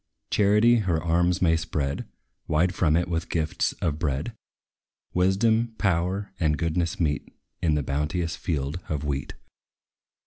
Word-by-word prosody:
Charity 105 +4 +5
her 90 -7 +1
arms 85 +2 +1
may 80 -2 +4
spread 70 -3 -2 0.4
Wide 85 +4 +2
from 80 -3 +2
it, 85 +1 +1
with 85 -1 -2
gifts 80 -2 0
of 80 -3 -2
bread. 75 - -1 0.8
Wisdom, 110 +5 +2
power, 95 +2 0
and 75 -2 +2
goodness 85 +1 -1
meet 75 -4 -1 0.3
In 80 -2 +2
the 75 - 0
bounteous 75 +5 -1
field 75 0 -2
of 75 -2 -2
wheat. 70 -2 -3
85 Hz, 135 wpm, -26 LUFS, 75-90 Hz, 0.8 s, Charity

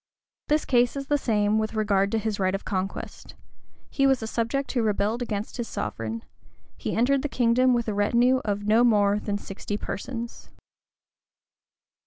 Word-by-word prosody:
The 300 - +4
case 245 -4 +2
is 275 0 -4
the 290 +1 +2
same 215 -3 +1
with 220 +1 -2
regard 200 -2 +2
to 225 - +1
his 215 -1 -2
right 190 0 +1
of 195 - -6
conquest: 190 -1 -4 0.6
he 275 -1 +3
was 265 -4 +2
a - - -2
subject 235 +5 -1
who 245 - 0
rebelled 215 +2 0
against 215 -2 -4
his 240 -2 -3
sovereign: 115 0 -4 0.5
he - - -4
entered 260 +4 +3
the 295 - -3
kingdom 250 +1 +3
with 235 -1 -1
a 215 - -1
retinue 240 +5 +3
of 205 -1 -2
no 220 +3 +4
more 205 -3 +3
than 205 -1 -2
sixty 205 +1 -5
persons. 235 +3 -6
220 Hz, 170 wpm, -26 LUFS, 205-245 Hz, 0.6 s, The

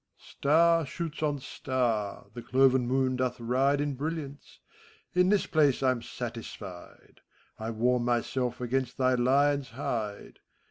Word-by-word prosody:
Star 165 +3 +3
shoots 155 +2 -5
on 150 -2 0
star, 125 -6 -2
the 120 - -7
cloven 130 0 +3
moon 130 0 +1
doth 130 -1 -1
ride 130 +4 +1
In 145 -1 -1
brilliance; 145 0 -6 0.5
in 180 +1 +4
this 205 -1 +3
place 145 -4 +2
I'm 130 -2 +2
satisfied: 115 -6 -8 0.4
I 110 +1 -4
warm 120 +2 +1
myself 120 +1 -1
against 125 +1 -1
thy 130 -1 +3
lion's 140 +2 +2
hide. 110 -4 -4
130 Hz, 130 wpm, -29 LUFS, 120-145 Hz, 0.5 s, in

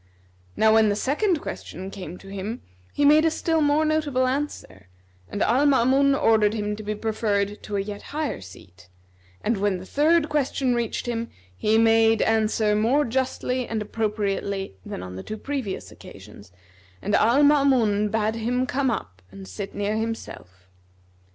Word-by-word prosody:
Now 220 0 +5
when 220 -1 +5
the 205 - +1
second 305 - 0
question 190 +4 -7
came 180 -3 -8
to 195 - -15
him, 200 +4 -5 0.3
he 290 - +1
made 305 +2 +6
a 325 - +4
still 325 0 0
more 295 +1 +3
notable 300 -4 +1
answer, 255 - -4 0.4
and 205 - -1
Al 270 +5 +3
Maamun 275 +1 +4
ordered 220 -4 +3
him 210 -1 -2
to - - -7
be 210 0 -3
preferred 210 -2 -1
to 210 - -6
a 200 - +1
yet 205 +1 -6
higher 300 - -3
seat; 95 -1 -15 0.5
and 225 0 0
when 200 -1 0
the 180 - -9
third 310 - +2
question 275 -3 0
reached 235 0 -2
him, 230 -1 -3 0.3
he 215 - +2
made 225 0 +4
answer 220 -1 +2
more 245 +8 +2
justly 255 0 -2
and 225 - -2
appropriately 205 - -2
than 90 - -7
on 90 0 -8
the - - -5
two 215 - -6
previous 260 -6 -4
occasions, 100 0 -13 0.5
and 205 - -3
Al 240 +6 +4
Maamun 255 -8 +3
bade 220 0 0
him 240 +3 -1
come 265 +1 0
up 90 - -5
and 95 -1 -11
sit 95 - -7
near 205 +1 -1
himself. 95 - -6
220 Hz, 165 wpm, -24 LUFS, 200-265 Hz, 0.5 s, made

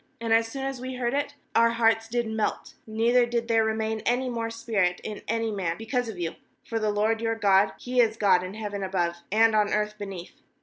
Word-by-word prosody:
nAnd 230 -1 -3
as 225 0 +4
soon 270 +4 -5
as 270 -2 -4
we 260 0 -5
had 250 - -7
heard 240 0 0
it, 285 0 -1 0.2
our 230 0 +5
hearts 225 -1 +2
did 240 +1 -1
melt, 220 -1 -2
neither 230 +3 +3
did 235 -1 -1
there 225 -1 +3
remain 220 0 -1
any 245 +4 0
more 230 -1 -2
spint 220 -6 0
in 210 -1 -6
any 225 0 -1
man, 180 -5 -2
because 240 +1 -2
of 210 - -7
you; 170 -2 -3 0.3
for 230 - -2
the 215 -1 0
LORD 215 +2 +1
your 225 0 0
God, 200 -2 +4
He 250 0 -2
is 225 -1 +1
God 200 -4 +4
in 185 +2 -6
heaven 205 -2 -5
above, 175 -3 -1
and 225 +1 +4
on 210 -1 +2
earth 210 0 -1
beneath. 195 -4 -7
225 Hz, 225 wpm, -26 LUFS, 205-230 Hz, 0.3 s, our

